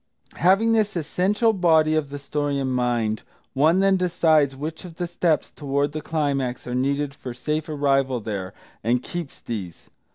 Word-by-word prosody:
Having 195 +6 +4
this 215 -3 +2
essential 195 +7 +1
body 160 -5 +4
of 155 -3 0
the 145 - -5
story 145 0 -2
in 135 -1 -1
mind, 120 -3 0 0.3
one 160 +7 +4
then 195 -1 +4
decides 160 -6 +3
which 155 +5 -6
of 175 -3 -10
the 175 - -2
steps 170 -3 0
toward 140 0 -1
the 155 +1 -4
climax 140 -6 -1
are 125 - -4
needed 140 +2 0
for 125 -3 -8
safe 150 +5 -2
arrival 135 -3 +1
there, 100 -4 -4 0.3
and 120 +3 +1
keeps 170 -5 -6
these. 95 -8 -7
145 Hz, 165 wpm, -24 LUFS, 130-170 Hz, 0.3 s, Having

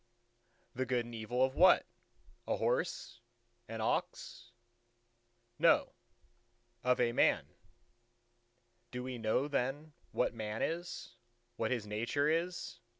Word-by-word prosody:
"The 130 +1 -2
good 125 -1 +1
and 120 - -10
evil 115 +3 0
of 130 - -4
what? 185 +6 +6 0.6
a - - +1
horse, 485 - -1 0.5
an 115 -1 -5
ox?" 120 +2 -2 1.1
"No; - - +4 0.9
of 125 0 +3
a 120 -1 +3
man." - - +3 1.4
"Do 125 +1 -5
we 125 -1 -5
know 115 +5 +1
then 145 +2 -2 0.2
what - - +1
Man 110 -1 -3
is? 165 -7 -4 0.4
what 115 -2 -1
his 120 -4 -1
nature 120 +7 0
is? 170 0 -1
125 Hz, 115 wpm, -34 LUFS, 115-145 Hz, 1.4 s, what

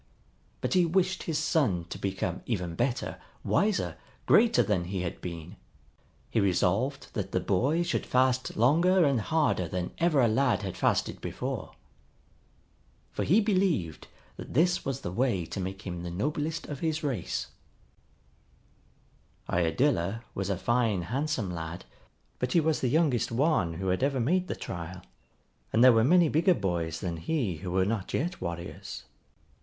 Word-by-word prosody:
But - - -1
he 185 -1 +5
wished 185 +2 +1
his 160 -3 -2
son 135 - +1
to - - -6
become 95 -2 -2
even 90 -8 -2
better, 120 +7 -2 0.2
wiser, 205 -2 +1 0.3
greater 235 0 +5
than 95 -5 0
he 95 +1 -3
had 85 - -5
been. 85 +2 -7 0.7
He - - +2
resolved 100 +8 0
that - - -3
the - - +2
boy 140 - +1
should - - -2
fast 130 0 +1
longer 170 - +4
and 135 -5 +2
harder 150 - +1
than 90 +1 -3
ever 165 -4 +3
a 120 - +5
lad 125 0 +2
had 95 -2 -4
fasted - - 0
before. - - -4 1.4
For - - -2
he 190 +8 +4
believed 185 - 0 0.3
that - - -9
this 175 +4 +3
was 135 -2 -3
the 85 - -4
way 115 -5 0
to 90 - -6
make 95 +1 -5
him 90 -2 -5
the 85 - -5
noblest 150 - -2
of 145 -2 -6
his 160 -1 -1
race. 125 - -2 2.0
Iadilla 100 - +1
was 95 0 -3
a 95 - 0
fine 115 -2 +1
handsome 125 - -2
lad, 80 +1 -6 0.5
but 125 0 -1
he 170 - +5
was 160 -1 +1
the 130 - +1
youngest 145 -5 +2
one 115 - +1
who 95 +3 -2
had 90 - 0
ever 135 0 +1
made 180 +10 +1
the - - -3
trial, 85 +1 -7 0.7
and 115 - +4
there 130 -1 +9
were 115 0 +4
many 175 +6 +5
bigger 165 +5 +3
boys 85 - -2
than 85 -3 -3
he 105 - -1
who 90 +4 -6
were 95 +1 +2
not 105 -1 -2
yet 175 +4 -2
warriors. 85 0 -6
120 Hz, 160 wpm, -28 LUFS, 90-155 Hz, 2.0 s, there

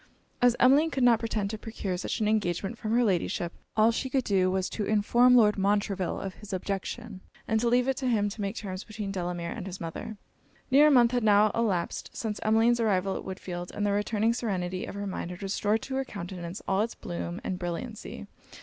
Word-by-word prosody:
As 245 -1 +5
Emmeline 280 +6 +5
could 270 -4 -1
not 235 -2 +5
pretend 215 -3 -2
to 220 - -5
procure 210 -5 -4
such 180 +4 -3
an 210 - +2
engagement 200 0 0
from 220 -1 -5
her 245 - +4
Ladyship, 175 -4 0 0.2
all 220 +1 +5
she 260 +3 -2
could 265 0 +1
do 190 -4 +2
was 185 0 0
to 215 - -2
inform 235 +4 +4
Lord 210 -4 +5
Montreville 200 -2 0
of 195 -1 -5
his 210 0 -10
objection, 195 +2 -4 0.3
and 220 - +2
to 235 +1 +1
leave 245 +1 +3
it 265 -2 0
to 260 - -2
him 215 -4 +2
to 210 +1 -7
make 200 +1 -2
terms 190 -4 -5
between 215 -2 -5
Delamere 175 -2 -3
and 200 -5 -6
his 190 0 -7
mother. 170 +6 -6 0.5
Near 290 +3 +7
a - - +6
month 245 -4 +5
had 245 -2 0
now 210 0 +5
elapsed 205 -7 -1
since 215 -2 -3
Emmeline's 225 +2 +3
arrival 195 -4 +1
at - - -5
Woodfield; 180 -2 -6
and 205 - -3
the 205 - +2
returning 210 +2 +1
serenity 185 -6 -2
of - - -7
her 200 0 -4
mind 185 -3 -4
had 180 +2 -8
restored 205 +2 0
to 270 - -6
her 270 - 0
countenance 180 -5 -7
all 195 +1 +2
it's 230 +2 -2
bloom 175 +1 -5
and 185 -6 -3
brilliancy. 190 +6 -5
210 Hz, 215 wpm, -28 LUFS, 190-230 Hz, 0.5 s, Near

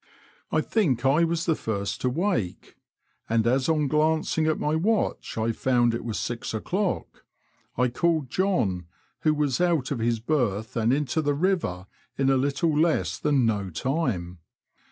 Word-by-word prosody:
I - - +2
think 135 - 0
I 145 +5 +4
was 170 0 0
the 165 - +3
first 100 -8 -3
to 125 - +1
wake, 155 - -2 0.5
and 115 0 +2
as 130 +4 +2
on 155 -2 +2
glancing 155 +1 +1
at 155 - +1
my 150 +1 0
watch 210 - 0
I 110 +1 +1
found 120 0 +2
it 115 - -3
was 115 -3 -3
six 120 -2 -4
o'clock, 185 - -2 0.5
I 125 +1 +3
called 155 +1 0
John, 105 - 0 0.3
who 155 -1 +2
was 145 -3 0
out 165 -7 +1
of 135 - -1
his 115 0 0
berth 110 -5 -1
and 115 0 +2
into 150 +3 0
the 145 -1 0
river 160 - 0 0.3
in 135 0 +2
a - - +4
little 140 +4 +1
less 145 - +1
than 145 -4 +2
no 100 -4 0
time. 90 - -2
135 Hz, 165 wpm, -26 LUFS, 115-160 Hz, 0.5 s, I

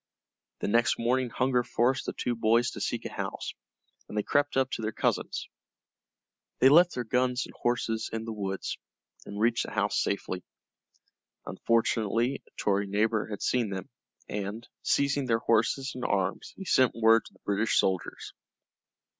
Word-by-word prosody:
The - - -1
next 115 +3 +3
morning 125 +2 +1
hunger 125 +1 +1
forced 125 +3 +1
the - - -2
two 125 - -1
boys 115 +1 +2
to - - -7
seek - - -2
a - - -4
house, - - -4 0.6
and 105 - -6
they 105 - +1
crept 145 +3 +1
up 135 0 +2
to - - -3
their 110 0 -1
cousin's. - - -1 1.1
They 130 - +6
left 170 +4 +6
their 125 - -2
guns 125 +2 +1
and - - -13
horses 115 -2 -1
in 110 0 -4
the 115 - -4
woods, 95 -2 -4 0.5
and 100 - -6
reached 115 +2 +2
the - - -8
house 105 -1 +1
safely. 95 -2 -2 1.0
Unfortunately 115 +2 +1
a - - -23
Tory 100 0 +1
neighbor 110 +2 +1
had 105 -2 -5
seen 120 -4 +1
them, 95 -1 -6 0.4
and, 105 +3 -5
seizing 140 -1 +1
their 115 -2 +3
horses 125 +4 +1
and 125 - -6
arms, 95 -1 -1
he 195 - -7
sent 130 -8 +3
word 115 0 +5
to - - -14
the - - -24
British 105 +2 +1
soldiers. 95 -2 -1
115 Hz, 165 wpm, -29 LUFS, 105-125 Hz, 1.1 s, They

